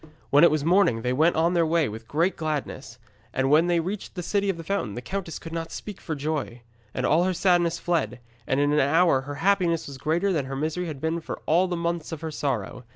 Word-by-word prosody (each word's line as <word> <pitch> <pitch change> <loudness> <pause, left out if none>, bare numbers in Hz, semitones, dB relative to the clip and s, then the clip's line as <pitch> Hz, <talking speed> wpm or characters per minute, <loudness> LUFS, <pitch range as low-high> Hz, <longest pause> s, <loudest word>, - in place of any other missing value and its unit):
When 145 +3 +6
it 170 - +8
was 155 -1 -1
morning 170 - +3
they 125 - 0
went 160 +6 +3
on 165 +2 +2
their 170 -1 +3
way 165 -1 +2
with 110 +2 -8
great 165 +8 +1
gladness. 145 -6 -4 0.4
And 135 +1 +1
when 160 +3 +5
they 175 -1 +2
reached 190 +5 -5
the 180 - -4
City 200 +3 0
of 190 - -1
the 165 - -7
Fountain, 160 - -2
the - - -4
countess 190 -1 -4
could 165 - -9
not 165 -1 -4
speak 210 -3 -8
for 160 - -4
joy, 145 -5 -3 0.3
and - - -2
all 160 +4 +3
her 185 -1 0
sadness 175 -2 +2
fled, 135 -11 -1 0.3
and 130 - +1
in 145 +1 +2
an 150 - +3
hour 150 0 +3
her 145 +2 -7
happiness 175 0 +1
was 140 -2 -9
greater 170 +7 +1
than 150 -5 0
her 135 0 -5
misery 160 +5 -2
had 145 -4 -6
been 160 +1 -1
for - - -6
all 175 +4 +3
the 175 -1 -2
months 170 -1 -2
of 160 -2 -6
her 160 -1 -4
sorrow. 130 -5 -3
160 Hz, 245 wpm, -25 LUFS, 140-175 Hz, 0.4 s, it